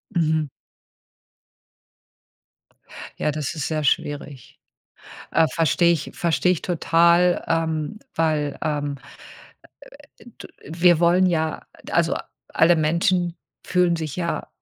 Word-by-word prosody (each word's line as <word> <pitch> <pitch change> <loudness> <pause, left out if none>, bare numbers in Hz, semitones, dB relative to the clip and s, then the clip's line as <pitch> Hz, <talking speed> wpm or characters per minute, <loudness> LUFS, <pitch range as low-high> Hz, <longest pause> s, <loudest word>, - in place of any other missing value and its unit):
Mhm. 160 -2 +1 2.7
Ja, 150 - 0
das 155 +1 -4
ist 150 - -3
sehr 155 -1 -2
schwierig. 145 -2 -3 0.7
Ah, 165 0 +3
verstehe 165 +2 +2
ich 165 -4 -2
verstehe 170 +2 +1
ich 175 - -2
total, 170 +1 +3
ähm, 160 +1 -1 0.2
weil, 155 -3 0
ähm, 145 -2 -2 1.2
äh, - - -18
d - - -13 0.2
wir 170 +1 +3
wollen 175 +2 +4
ja 160 -3 -1 0.2
also, - - +2 0.3
alle 170 +2 +4
Menschen 170 +2 +1 0.3
fühlen 180 -1 +2
sich 155 -3 -5
ja 170 -2 -3
165 Hz, 105 wpm, -22 LUFS, 155-175 Hz, 2.7 s, wollen